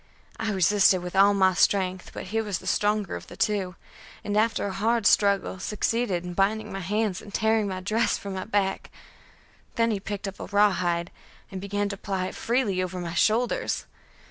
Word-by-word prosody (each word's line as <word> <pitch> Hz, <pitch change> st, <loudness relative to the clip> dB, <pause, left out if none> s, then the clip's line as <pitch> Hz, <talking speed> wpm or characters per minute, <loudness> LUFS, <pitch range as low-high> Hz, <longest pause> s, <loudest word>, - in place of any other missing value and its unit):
I 225 Hz, -1 st, -1 dB
resisted 190 Hz, -1 st, +4 dB
with 180 Hz, +1 st, -6 dB
all 200 Hz, +1 st, +6 dB
my 190 Hz, -1 st, +4 dB
strength, 185 Hz, -1 st, +1 dB
but -, -, -7 dB
he 225 Hz, -, +2 dB
was 205 Hz, -4 st, -2 dB
the -, -, -13 dB
stronger 210 Hz, -1 st, 0 dB
of -, -, -8 dB
the -, -, -12 dB
two, 200 Hz, -5 st, 0 dB, 0.5 s
and 205 Hz, -, -2 dB
after 220 Hz, 0 st, +2 dB
a 200 Hz, -, -3 dB
hard 225 Hz, +2 st, 0 dB
struggle 200 Hz, -1 st, +3 dB
succeeded 210 Hz, -2 st, -1 dB
in 180 Hz, -, -5 dB
binding 210 Hz, +3 st, 0 dB
my 195 Hz, -, -4 dB
hands 200 Hz, 0 st, -1 dB
and 205 Hz, -, -12 dB
tearing 220 Hz, 0 st, +1 dB
my 185 Hz, -1 st, -4 dB
dress 215 Hz, +4 st, +1 dB
from 200 Hz, -1 st, -7 dB
my 190 Hz, 0 st, -4 dB
back. 200 Hz, -3 st, -1 dB, 0.9 s
Then 230 Hz, -1 st, +2 dB
he 205 Hz, -, -1 dB
picked 200 Hz, +1 st, -5 dB
up 195 Hz, -, -7 dB
a -, -, -5 dB
rawhide, 185 Hz, -4 st, +1 dB, 0.4 s
and 190 Hz, -1 st, -6 dB
began 205 Hz, +1 st, -1 dB
to 200 Hz, -, -5 dB
ply 190 Hz, -2 st, -3 dB
it -, -, -5 dB
freely 225 Hz, -6 st, 0 dB
over 185 Hz, 0 st, -4 dB
my 170 Hz, -1 st, -5 dB
shoulders. 235 Hz, -, +1 dB
200 Hz, 195 wpm, -26 LUFS, 185-215 Hz, 0.9 s, all